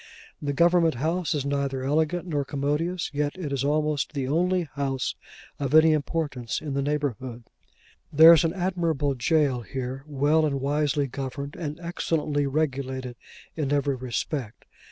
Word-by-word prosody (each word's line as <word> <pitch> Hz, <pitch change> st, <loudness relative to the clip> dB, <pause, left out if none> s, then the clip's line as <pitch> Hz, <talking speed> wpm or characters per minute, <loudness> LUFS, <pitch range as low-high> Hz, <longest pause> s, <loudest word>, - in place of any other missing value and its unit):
The 145 Hz, -, -1 dB
Government 170 Hz, +1 st, +3 dB
House 165 Hz, +5 st, -1 dB
is 140 Hz, -2 st, -2 dB
neither 140 Hz, -2 st, -1 dB
elegant 160 Hz, +5 st, 0 dB
nor 150 Hz, -5 st, -1 dB
commodious, 150 Hz, +6 st, -2 dB
yet 145 Hz, +3 st, -1 dB
it 155 Hz, -7 st, -4 dB
is 135 Hz, -1 st, -1 dB
almost 150 Hz, 0 st, 0 dB
the 135 Hz, -3 st, -2 dB
only 180 Hz, +5 st, +1 dB
house 135 Hz, -2 st, -2 dB, 0.5 s
of 140 Hz, +1 st, 0 dB
any 155 Hz, 0 st, +7 dB
importance 145 Hz, -5 st, -2 dB
in 150 Hz, -3 st, -5 dB
the 140 Hz, -, 0 dB
neighbourhood. 130 Hz, -5 st, -3 dB, 0.7 s
There 160 Hz, +3 st, +9 dB
is 165 Hz, -, +4 dB
an 165 Hz, -, +1 dB
admirable 170 Hz, -6 st, 0 dB
jail 135 Hz, -1 st, +1 dB
here, 130 Hz, +2 st, -5 dB
well 150 Hz, +2 st, +2 dB
and 140 Hz, -3 st, 0 dB
wisely 145 Hz, +1 st, +1 dB
governed, 140 Hz, +2 st, -5 dB
and 150 Hz, -1 st, -5 dB
excellently 155 Hz, -4 st, -1 dB
regulated, 130 Hz, -3 st, -2 dB, 0.4 s
in 145 Hz, -4 st, -2 dB
every 145 Hz, -1 st, +1 dB
respect. 130 Hz, -1 st, -4 dB
145 Hz, 150 wpm, -26 LUFS, 135-160 Hz, 0.7 s, There